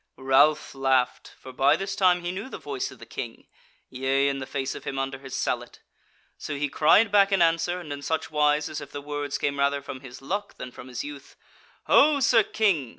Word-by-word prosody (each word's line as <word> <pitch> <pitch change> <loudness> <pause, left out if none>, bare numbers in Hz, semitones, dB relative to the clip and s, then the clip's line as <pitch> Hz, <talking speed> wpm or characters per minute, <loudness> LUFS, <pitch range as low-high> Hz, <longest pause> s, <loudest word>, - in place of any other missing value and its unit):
Ralph 140 +3 +3
laughed; 135 -2 0
for 130 - -10
by 140 +3 +4
this 195 +3 -4
time 180 -2 +3
he 175 - -2
knew 200 +7 -6
the - - -7
voice 140 -3 -4
of - - -13
the - - -12
King, - - -7 0.4
yea, 135 +2 +1
and 135 -1 -3
the 130 - -6
face 135 -1 -3
of - - -9
him 135 - -5
under 135 0 -3
his 135 -1 -6
sallet. - - -3 0.6
So 145 - -5
he 145 0 -1
cried 165 +10 +4
back 200 -1 +5
in 195 - +3
answer, 170 +1 +2
and 155 -5 -6
in 145 - -7
such 160 +3 -2
wise 150 0 +2
as 155 -1 -6
if 145 - -9
the 145 - -6
words 145 0 -4
came 140 0 -2
rather 140 0 +2
from 130 - -7
his 130 -2 -11
luck 200 +9 -4
than 125 - -7
from 125 - -11
his 125 -2 -5
youth: 145 -1 -10 0.5
"Ho, 290 0 +5
Sir 240 -3 +5
King! 195 - 0
145 Hz, 220 wpm, -26 LUFS, 135-175 Hz, 0.6 s, back